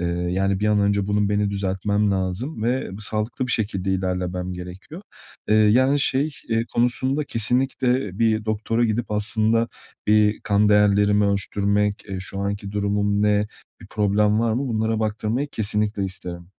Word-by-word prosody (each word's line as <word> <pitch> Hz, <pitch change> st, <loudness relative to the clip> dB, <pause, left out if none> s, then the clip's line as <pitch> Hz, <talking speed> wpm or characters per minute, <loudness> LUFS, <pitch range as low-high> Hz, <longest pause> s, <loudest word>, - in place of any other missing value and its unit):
Eee, 85 Hz, -, -1 dB
yani 90 Hz, +3 st, -1 dB
bir 105 Hz, -, +1 dB
an 105 Hz, -1 st, +3 dB
önce 100 Hz, -1 st, +1 dB
bunun 105 Hz, 0 st, +1 dB
beni 105 Hz, 0 st, +1 dB
düzeltmem 100 Hz, +1 st, 0 dB
lazım 95 Hz, -, -2 dB
ve 125 Hz, -1 st, -1 dB
sağlıklı 110 Hz, +4 st, -2 dB
bir 125 Hz, -, -1 dB
şekilde 95 Hz, -3 st, -1 dB
ilerlemem 90 Hz, -1 st, -2 dB
gerekiyor. 90 Hz, -, -9 dB, 0.5 s
Eee, 105 Hz, -, +4 dB
yani 130 Hz, +7 st, +4 dB
şey, 140 Hz, +3 st, +1 dB, 0.2 s
eee, 115 Hz, 0 st, +1 dB
konusunda 130 Hz, +4 st, +1 dB
kesinlikle 125 Hz, -2 st, 0 dB
bir 110 Hz, -2 st, +2 dB
doktora 110 Hz, +2 st, 0 dB
gidip 110 Hz, 0 st, -1 dB
aslında 110 Hz, +2 st, +1 dB, 0.4 s
bir 105 Hz, 0 st, +3 dB
kan 105 Hz, 0 st, +2 dB
değerlerimi 105 Hz, 0 st, +4 dB
ölçtürmek, 100 Hz, +1 st, 0 dB
eee, 95 Hz, -1 st, -4 dB
şu 95 Hz, +1 st, -5 dB
anki 100 Hz, 0 st, -3 dB
durumum 100 Hz, 0 st, 0 dB
ne, 105 Hz, 0 st, +2 dB, 0.3 s
bir -, -, -12 dB
problem 105 Hz, +1 st, +1 dB
var 115 Hz, -1 st, +1 dB
mı, 130 Hz, +3 st, -1 dB
bunlara 110 Hz, 0 st, 0 dB
baktırmayı 110 Hz, +6 st, -1 dB
kesinlikle 105 Hz, -1 st, -1 dB
isterim. 90 Hz, -2 st, -6 dB
105 Hz, 150 wpm, -23 LUFS, 100-115 Hz, 0.5 s, Eee